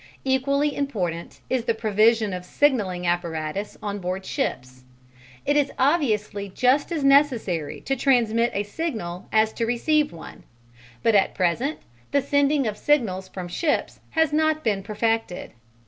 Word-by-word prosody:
Equally 280 Hz, +2 st, +1 dB
important 180 Hz, -12 st, -3 dB
is 255 Hz, -3 st, -1 dB
the 230 Hz, -, +1 dB
provision 220 Hz, -1 st, +2 dB
of 180 Hz, 0 st, -5 dB
signalling 190 Hz, -6 st, +1 dB
apparatus 175 Hz, +2 st, -2 dB
on 205 Hz, -1 st, -3 dB
board 185 Hz, +1 st, -4 dB
ships: 130 Hz, -, -3 dB, 0.6 s
it 290 Hz, -, +2 dB
is 290 Hz, -2 st, +2 dB
obviously 215 Hz, -, +1 dB
just 255 Hz, -, +2 dB
as 315 Hz, -4 st, -1 dB
necessary 245 Hz, -, +2 dB
to 270 Hz, -, -1 dB
transmit 240 Hz, -3 st, +2 dB
a 200 Hz, -, 0 dB
signal 205 Hz, -, -5 dB
as 220 Hz, 0 st, +3 dB
to 230 Hz, -, -2 dB
receive 295 Hz, +6 st, +1 dB
one; 165 Hz, -, -11 dB, 0.6 s
but 230 Hz, -, +3 dB
at 200 Hz, -2 st, +3 dB
present 215 Hz, -, 0 dB, 0.3 s
the 280 Hz, -, +2 dB
sending 285 Hz, 0 st, +2 dB
of 210 Hz, -2 st, -2 dB
signals 205 Hz, -11 st, +1 dB
from 185 Hz, -1 st, -7 dB
ships 295 Hz, -, -1 dB
has 320 Hz, -2 st, +1 dB
not 315 Hz, 0 st, +2 dB
been 205 Hz, -4 st, 0 dB
perfected. 215 Hz, -1 st, -2 dB
225 Hz, 145 wpm, -24 LUFS, 190-280 Hz, 0.6 s, as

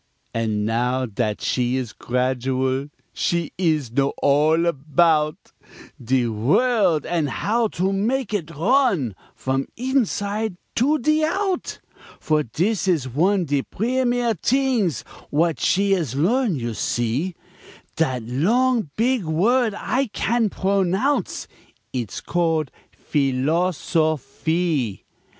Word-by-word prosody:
An' 110 Hz, -2 st, -1 dB
now 125 Hz, +3 st, 0 dB
dat 110 Hz, -1 st, -2 dB
she 125 Hz, 0 st, 0 dB
is 125 Hz, -4 st, -3 dB
gradual 130 Hz, +2 st, -1 dB, 0.3 s
She 170 Hz, -2 st, -1 dB
ees 155 Hz, -9 st, 0 dB
know 140 Hz, +3 st, +1 dB
all 155 Hz, +4 st, +3 dB
about 155 Hz, 0 st, +1 dB, 0.5 s
De 125 Hz, +1 st, +2 dB
world 160 Hz, -, +2 dB
an' 165 Hz, -4 st, 0 dB
how 225 Hz, -, 0 dB
to 190 Hz, -1 st, -1 dB
mak' 225 Hz, +4 st, -1 dB
it 170 Hz, -7 st, -2 dB
run 175 Hz, -, +2 dB, 0.2 s
From 135 Hz, +1 st, -2 dB
inside 220 Hz, -5 st, -1 dB, 0.2 s
to 285 Hz, +6 st, +2 dB
de 305 Hz, +3 st, +2 dB
out; 375 Hz, +3 st, -1 dB, 0.4 s
For 155 Hz, -1 st, +1 dB
dis 180 Hz, -, -1 dB
is 160 Hz, -8 st, +1 dB
one 175 Hz, +9 st, +1 dB
de 145 Hz, -2 st, 0 dB
primere 245 Hz, -, 0 dB
t'ings 245 Hz, -, +1 dB, 0.3 s
W'at 165 Hz, +2 st, +1 dB
she 200 Hz, +1 st, +2 dB
is 160 Hz, -10 st, -1 dB
learn, 210 Hz, -, +2 dB
you 120 Hz, -3 st, -3 dB
see, 120 Hz, -, -1 dB, 0.6 s
Dat 130 Hz, -7 st, 0 dB
long 220 Hz, -, +1 dB
beeg 245 Hz, 0 st, +1 dB
word 210 Hz, +8 st, +2 dB
I 260 Hz, +4 st, 0 dB
can 225 Hz, +1 st, 0 dB
pronounce, 195 Hz, +8 st, 0 dB, 0.5 s
It's 120 Hz, -6 st, -4 dB
call 165 Hz, -2 st, +1 dB, 0.3 s
philosophee. 155 Hz, -, 0 dB
165 Hz, 110 wpm, -22 LUFS, 130-220 Hz, 0.6 s, all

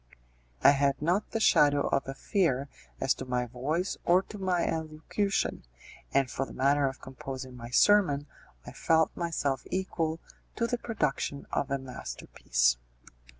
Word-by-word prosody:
I -, -, +9 dB
had 140 Hz, -1 st, +1 dB
not 175 Hz, +7 st, 0 dB
the 225 Hz, -, -2 dB
shadow 145 Hz, -8 st, +5 dB
of 135 Hz, -, 0 dB
a 135 Hz, -, -5 dB
fear 140 Hz, -, 0 dB, 0.3 s
as -, -, +2 dB
to 130 Hz, -, -7 dB
my 125 Hz, -1 st, -1 dB
voice 145 Hz, +10 st, -2 dB
or 180 Hz, +2 st, +4 dB
to 210 Hz, -, -10 dB
my 185 Hz, -2 st, +1 dB
elocution, 160 Hz, +5 st, -2 dB, 0.5 s
and 135 Hz, -1 st, +3 dB
for 130 Hz, -, -2 dB
the -, -, -11 dB
matter 140 Hz, +1 st, +3 dB
of 135 Hz, -1 st, -5 dB
composing 130 Hz, 0 st, -7 dB
my 120 Hz, -1 st, -8 dB
sermon 145 Hz, -1 st, +4 dB, 0.4 s
I -, -, -8 dB
felt 160 Hz, 0 st, +2 dB
myself 150 Hz, -6 st, -1 dB
equal 165 Hz, -4 st, -2 dB, 0.4 s
to 235 Hz, -, 0 dB
the 245 Hz, +1 st, -1 dB
production 150 Hz, -, -2 dB
of 140 Hz, -, -1 dB
a 140 Hz, -, 0 dB
masterpiece. -, -, -1 dB
145 Hz, 150 wpm, -29 LUFS, 130-175 Hz, 0.5 s, I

